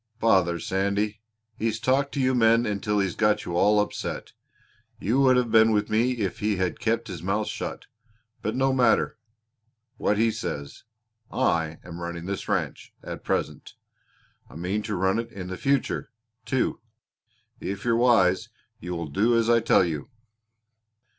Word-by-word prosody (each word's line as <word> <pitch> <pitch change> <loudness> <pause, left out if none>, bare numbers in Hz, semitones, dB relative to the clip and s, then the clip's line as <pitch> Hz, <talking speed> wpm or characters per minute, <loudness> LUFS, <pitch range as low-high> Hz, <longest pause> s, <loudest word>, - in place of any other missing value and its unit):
"Bother 95 -6 +3
Sandy! 100 +3 -1 0.4
He's 110 0 -1
talked 135 +4 +1
to 140 - -2
you 130 -1 +2
men 115 -1 +4
until 105 0 -1
he's 95 -3 +1
got 105 -1 +2
you 85 - -4
all 105 +4 +4
upset. 105 - -3 0.7
You 120 +8 +1
would 130 -2 +5
have 120 -3 +1
been 110 0 +6
with 105 0 0
me 120 +4 +2
if 105 -7 -3
he 105 0 +1
had 90 -2 -2
kept 115 +1 0
his 90 -5 -6
mouth 100 +4 -1
shut. - - -5 0.6
But 110 +2 -2
no 135 +1 +2
matter 125 -3 +2 0.8
what 105 - +1
he 115 +1 +3
says 70 -8 -6 0.5
I 80 -2 0
am 85 -1 -9
running 85 0 -5
this 100 +1 -4
ranch - - -2
at - - -7
present. - - -3 0.7
I - - -14
mean 90 +6 -2
to 105 -1 -3
run 95 +4 +1
it 115 0 -5
in 90 -2 -7
the 95 - -4
future, 140 +7 0 0.4
too. 130 -1 0 0.8
If 100 +2 -5
you're 115 -1 +3
wise 115 -7 +3 0.3
you 90 +1 -5
will 85 -1 -4
do 110 +10 +2
as 115 0 +2
I 115 - +5
tell 105 -4 +4
you." 80 - -4
105 Hz, 165 wpm, -26 LUFS, 95-115 Hz, 0.8 s, been